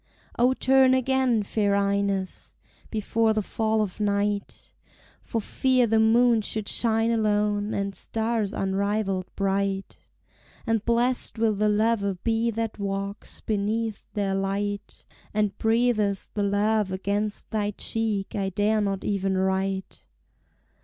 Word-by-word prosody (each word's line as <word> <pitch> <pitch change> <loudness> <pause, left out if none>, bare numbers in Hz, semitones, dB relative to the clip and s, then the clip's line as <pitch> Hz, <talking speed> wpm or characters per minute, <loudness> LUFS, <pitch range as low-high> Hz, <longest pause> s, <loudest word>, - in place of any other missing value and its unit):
O 250 +2 +4
turn 260 0 +4
again, 260 -3 +2
fair 200 0 +1
Ines, 200 -1 -1 0.3
before 220 +1 +1
the 215 -1 0
fall 220 +1 0
of 200 0 -6
night, 205 0 -2 0.5
For 230 - -3
fear 255 +3 +2
the 225 -1 +2
moon 230 +1 +4
should 215 0 -3
shine 225 0 +2
alone, 210 -1 +1
and 200 0 -2
stars 220 -1 -1
unrivalled 195 -1 -1
bright; 195 0 -1 0.7
And 225 -3 0
blessèd 240 +1 +1
will 220 -1 +2
the 210 +1 +1
lover 210 -2 +1
be 225 +5 0
that 225 -1 -3
walks 200 +1 -4
beneath 215 +1 -2
their 200 -2 0
light, 200 +1 -3 0.3
And 210 -2 +1
breathes 220 -3 +1
the 210 - -1
love 205 0 +1
against 205 +2 -2
thy 210 -2 0
cheek 210 -1 -2
I 195 -1 -1
dare 210 +3 +1
not 195 -2 -2
even 195 -2 0
write! 190 0 -2
210 Hz, 125 wpm, -25 LUFS, 200-225 Hz, 0.7 s, O